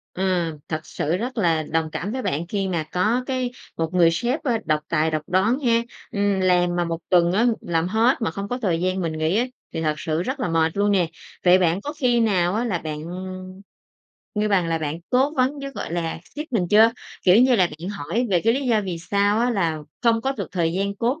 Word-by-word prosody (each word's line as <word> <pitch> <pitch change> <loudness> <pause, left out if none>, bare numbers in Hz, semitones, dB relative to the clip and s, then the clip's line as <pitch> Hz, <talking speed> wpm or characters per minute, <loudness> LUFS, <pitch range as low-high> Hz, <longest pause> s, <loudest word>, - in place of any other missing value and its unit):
Ừ, 190 - -2 0.5
thật 155 -1 -1
sự 160 +4 -2
rất 245 +3 -4
là 165 -5 +2
đồng 160 +1 -1
cảm 200 +7 -4
với 260 +1 -3
bạn 160 - -2
khi 195 +1 -1
mà 170 -4 -1
có 220 +8 +1
cái 255 -2 -1 0.3
một 165 +1 -2
người 170 -2 +5
sếp, 245 - -1
ơ, 255 - +1
độc 155 -1 +2
tài, 160 -1 +1
độc 155 -1 -1
đoán 200 +9 +2
ha. 235 -4 +2 0.3
Ừm, 200 -1 +1
làm 180 -1 +2
mà 175 - +1
một 165 0 -3
tuần 175 -2 +4
á, 220 +6 +2 0.2
làm 165 0 0
hết 230 +5 +2
mà 215 - 0
không 200 +3 -5
có 245 +4 -2
thời 175 -5 0
gian 185 +1 0
mình 165 -2 -2
nghỉ 160 +6 +1
á 245 - +2 0.3
thì 160 - -2
thật 155 -1 0
sự 160 +2 -2
rất 265 +5 -3
là - - -1
mệt 165 +2 +1
luôn 205 0 +3
nè. 185 -4 +3 0.4
Vậy 180 +1 +7
bạn 175 +2 +1
có 290 +5 -5
khi 245 -5 +2
nào 190 -6 +2
á 230 - 0
là 210 -8 0
bạn, 155 -2 -5 1.4
ngư 210 0 +1
bằng 185 -4 +2
là, 165 - 0
bạn 155 +1 -3
cố 265 +3 +3
vấn 265 +2 +1
với, 275 0 -5
gọi 170 - -6
là, 165 -2 -2 0.2
sếp 300 +1 -5
mình 185 -6 +1
chưa? 220 +2 +7 0.3
Kiểu 185 +2 +6
như 250 +1 +5
là 185 - +4
bạn 175 - -5
hỏi 205 +7 -2
về 175 -2 +3
cái 225 - +5
lý 275 0 -2
do 225 -3 +3
vì 175 -3 -4
sao 200 +5 +1
á 245 - +2
là 170 -8 0 0.2
không 230 -1 +3
có 270 +2 -1
được - - -5
thời 170 -3 0
gian 200 +2 -1
cố 250 +9 0
190 Hz, 240 wpm, -23 LUFS, 165-235 Hz, 1.4 s, Vậy